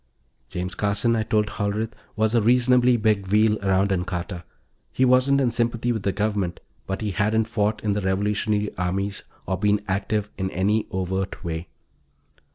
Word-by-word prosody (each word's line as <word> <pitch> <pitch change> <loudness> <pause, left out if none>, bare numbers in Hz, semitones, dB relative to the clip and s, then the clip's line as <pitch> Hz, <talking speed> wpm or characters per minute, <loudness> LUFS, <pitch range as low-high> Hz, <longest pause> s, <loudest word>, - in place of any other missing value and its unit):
James 90 0 -3
Carson, 105 +4 +1
I 110 - +1
told 105 0 +1
Hollerith, 105 +1 -2 0.2
was 110 +1 +1
a 115 - +4
reasonably 125 +1 +4
big 105 -3 +1
wheel 105 +2 +3
around 95 +1 +2
Ancarta. 90 -1 -3 0.5
He 130 - +2
wasn't 130 +2 +4
in 130 -3 +2
sympathy 120 0 0
with 110 -3 -2
the 100 - 0
Government, 100 -4 -1 0.3
but 95 +2 -3
he 105 -2 -1
hadn't 110 +4 +1
fought 105 -1 -1
in 105 - +1
the 105 +1 0
revolutionary 105 +2 0
armies 95 +3 -2 0.2
or 95 0 -2
been 105 0 +3
active 105 +2 -1
in 95 0 -1
any 105 +4 0
overt 95 +1 -3
way. 80 0 -4
105 Hz, 165 wpm, -24 LUFS, 95-110 Hz, 0.5 s, a